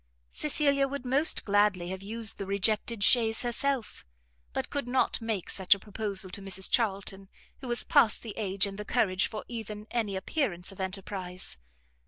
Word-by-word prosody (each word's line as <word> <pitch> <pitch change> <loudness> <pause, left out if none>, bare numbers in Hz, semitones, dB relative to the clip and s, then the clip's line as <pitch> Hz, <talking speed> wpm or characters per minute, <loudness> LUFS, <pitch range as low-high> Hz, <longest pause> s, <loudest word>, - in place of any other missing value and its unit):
Cecilia 280 -2 +2
would 280 -1 -5
most 275 +5 +3
gladly 205 -4 +2
have 190 0 -5
used 220 +2 -1
the 195 - -4
rejected 210 +2 0
chaise 225 0 +4
herself, 245 +1 -2 0.5
but - - -3
could 285 -3 -2
not 255 0 +1
make 220 -5 -2
such 190 +1 +4
a - - -11
proposal 200 -2 -2
to 200 - -6
Mrs 190 -1 +1
Charlton, 195 -4 0 0.3
who 265 - -7
was 240 0 +2
past 215 - +3
the 220 -3 -6
age 200 -2 +1
and 195 0 -6
the - - -3
courage 200 -4 +1
for 215 - -7
even 215 -3 -6
any 220 -5 -1
appearance 190 - -2
of 195 - -14
enterprize. 190 - -4
210 Hz, 170 wpm, -29 LUFS, 195-240 Hz, 0.5 s, chaise